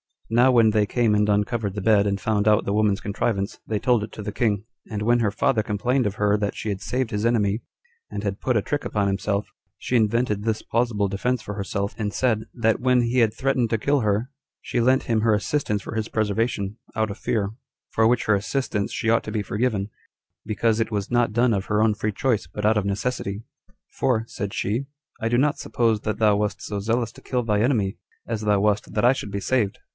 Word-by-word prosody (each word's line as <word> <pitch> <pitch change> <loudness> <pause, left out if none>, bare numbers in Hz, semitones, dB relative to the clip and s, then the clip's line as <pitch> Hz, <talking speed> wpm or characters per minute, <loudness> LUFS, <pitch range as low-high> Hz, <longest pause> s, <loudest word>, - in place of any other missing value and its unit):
Now 120 +3 +5
when 115 -3 +5
they 105 -1 +2
came 115 -2 +2
and 105 0 +3
uncovered 105 0 0
the 105 - -3
bed, 105 0 +4
and 100 -1 -1
found 105 0 0
out 105 -1 +4
the 100 - -1
woman's 105 -2 +2
contrivance, 100 0 -2
they 110 - 0
told 120 -1 +2
it 105 - -7
to 105 - -7
the 105 - -4
king; 105 -2 0 0.3
and 105 -3 -3
when 120 +3 +3
her 110 -3 +2
father 110 +3 +1
complained 115 +4 0
of 100 - -3
her 105 0 +2
that 105 -1 -2
she 110 - -4
had 100 -2 -3
saved 125 +2 -2
his 105 +1 -1
enemy, 110 -2 +1 0.5
and 100 - -5
had 100 -1 -2
put 125 - 0
a 105 - +3
trick 145 0 -2
upon 100 -2 0
himself, 100 +1 -1 0.3
she 125 - 0
invented 110 -1 +1
this 110 -1 -1
plausible 115 -4 0
defense 120 +5 -1
for 105 - -6
herself, 100 0 -3
and 105 -3 -2
said, 110 -4 +1
That 110 -2 +1
when 125 0 +3
he 120 +2 +1
had 110 -3 +3
threatened 130 -3 0
to 115 - +2
kill 140 +6 +1
her, 110 +3 0 0.3
she - - -2
lent 130 +3 +3
him 115 -3 +1
her 110 -1 +3
assistance 105 -1 -1
for 110 - -7
his 110 0 -1
preservation, 110 -1 -1 0.2
out 110 -1 0
of 100 - -7
fear; 105 -3 -1 0.4
for 110 0 +3
which 120 0 +2
her 110 - +3
assistance 105 0 -1
she 115 - -1
ought 115 - +3
to 110 - -5
be 105 -2 -1
forgiven, 105 -1 -1 0.6
because 110 +1 +1
it 115 0 -1
was 100 0 -2
not 120 -3 +2
done 120 +1 +3
of 95 -1 -1
her 105 0 +2
own 110 -1 +3
free 105 0 -2
choice, 115 -5 0
but 105 +5 -5
out 110 0 +4
of 105 - 0
necessity: 100 0 -2 0.6
"For," 120 -4 +2
said 100 -3 -5
she, 115 +7 -1 0.3
"I 115 - 0
do 120 +1 +2
not 145 +3 +2
suppose 115 -3 +1
that 110 -1 -3
thou 105 -2 +4
wast 105 -1 -2
so 105 - -4
zealous 115 +2 0
to - - -16
kill 125 -1 -1
thy 105 -2 +1
enemy, 110 -4 +1 0.3
as 115 -2 -3
thou 105 -2 +2
wast 105 0 0
that - - +1
I 125 - +7
should 130 -6 -3
be 100 0 -4
saved." 105 -2 0
110 Hz, 230 wpm, -24 LUFS, 105-120 Hz, 0.6 s, I